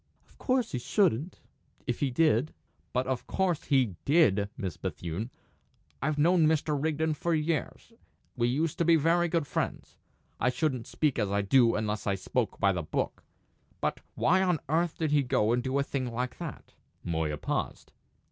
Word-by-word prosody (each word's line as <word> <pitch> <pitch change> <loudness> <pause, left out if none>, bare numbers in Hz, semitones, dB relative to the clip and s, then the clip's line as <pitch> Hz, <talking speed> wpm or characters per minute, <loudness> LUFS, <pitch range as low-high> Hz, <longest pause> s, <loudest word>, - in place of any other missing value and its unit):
"Of - - -26
course 255 -2 +1
he 125 - -2
shouldn't 170 - +1 0.4
if 120 - -2
he 140 - +1
did." 155 0 +2 0.4
"But 125 +1 0
of 130 -1 -3
course 180 -5 0
he 125 - +2
did, 115 - +3
Miss 95 -5 -4
Bethune. 90 +7 -4 0.7
I've 150 +2 0
known 165 +1 +4
Mr. 155 -1 +1
Rigden 155 +2 0
for 165 +3 0
years; 160 +8 -2 0.4
we 120 -2 +1
used 145 +5 -1
to - - +3
be 170 0 +5
very 165 +3 +3
good 165 -2 0
friends. - - -4 0.4
I 125 - +2
shouldn't 130 -2 -1
speak 150 -6 0
as 105 -3 0
I 100 +1 +1
do 115 +3 +4
unless 105 0 -2
I 100 - +2
spoke 95 - -2
by 100 - +4
the 90 -2 -2
book. 75 - -3 0.6
But - - -1 0.2
why 185 +3 +3
on 180 -4 +2
earth 165 +2 +1
did 160 -2 -1
he 150 -1 +4
go 115 -4 +1
and 120 +1 +2
do 130 +2 -1
a 140 - +2
thing 130 -3 -3
like 125 +2 -3
that?" - - -8 0.3
Moya 80 -3 -1
paused. - - -3
140 Hz, 175 wpm, -29 LUFS, 115-160 Hz, 0.7 s, be